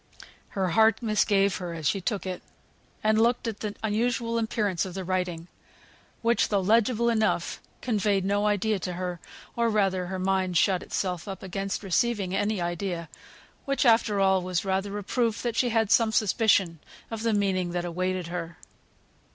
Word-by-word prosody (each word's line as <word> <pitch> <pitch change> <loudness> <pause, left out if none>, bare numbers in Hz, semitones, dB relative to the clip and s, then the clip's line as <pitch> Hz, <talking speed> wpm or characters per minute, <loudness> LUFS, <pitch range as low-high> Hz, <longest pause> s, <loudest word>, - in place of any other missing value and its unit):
Her 190 -2 +1
heart 220 +6 +3
misgave 205 -2 +2
her 175 -2 -5
as 155 -2 -2
she 195 - 0
took 200 +1 -2
it, 185 -1 -4 0.6
and 215 0 +3
looked 235 +1 +2
at 220 -2 -4
the 210 -1 -4
unusual 230 +2 0
appearance 210 -5 0
of 185 -1 -6
the 190 - -4
writing, 180 -2 -2 0.8
which, 235 +1 +2
though 205 - +2
legible 225 +4 +2
enough, 220 -6 0 0.2
conveyed 205 -5 +1
no 205 +1 +1
idea 210 0 +1
to 180 +1 -4
her, 180 -1 -4 0.4
or 235 -1 +2
rather 195 -4 +1
her 190 +1 -4
mind 185 -1 0
shut 185 +2 +3
itself 180 -2 -3
up 195 -1 -6
against 195 +2 -3
receiving 195 0 0
any 205 0 0
idea, 175 -1 -3 0.6
which 275 0 0
after 225 -3 +4
all 190 -1 +3
was 180 +1 -2
rather 195 +1 -1
a 205 - -5
proof 230 +2 -1
she 245 +2 +1
had 225 -2 +1
some 230 -1 +4
suspicion 200 -6 +2 0.3
of 225 -1 -4
the 230 0 +1
meaning 190 -4 +1
that 175 0 -2
awaited 185 +1 -2
her. 170 0 -5
195 Hz, 165 wpm, -27 LUFS, 185-220 Hz, 0.8 s, after